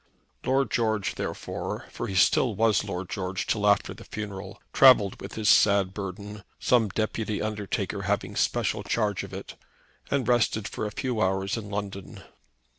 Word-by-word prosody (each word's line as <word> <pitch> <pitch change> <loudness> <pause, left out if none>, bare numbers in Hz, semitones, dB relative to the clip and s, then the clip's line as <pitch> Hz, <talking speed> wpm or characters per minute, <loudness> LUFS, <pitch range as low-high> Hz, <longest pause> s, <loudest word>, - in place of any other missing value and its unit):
Lord 135 +1 +1
George, 110 -4 0
therefore, - - -5
for 120 - -4
he 100 - -4
was 95 - +5
still 120 -5 +3
Lord 100 -4 +1
George 95 -1 -3
till 105 -2 0
after 100 0 +3
the - - -12
funeral, 100 -3 -7
travelled 125 -7 +6
with 95 - -8
his 110 -1 -2
sad 100 -3 +5
burden, 100 +1 -6 0.2
some 115 -4 +3
deputy 110 +1 -2
undertaker 105 -2 -3
having - - -1
special - - 0
charge 105 -4 -1
of - - -9
it, - - -7 0.6
and 135 -4 0
rested 115 -3 +2
for 110 - -4
a - - -6
few 120 0 -2
hours 95 0 +1
in 110 -3 -6
London. 100 -2 -6
105 Hz, 160 wpm, -27 LUFS, 100-110 Hz, 0.6 s, travelled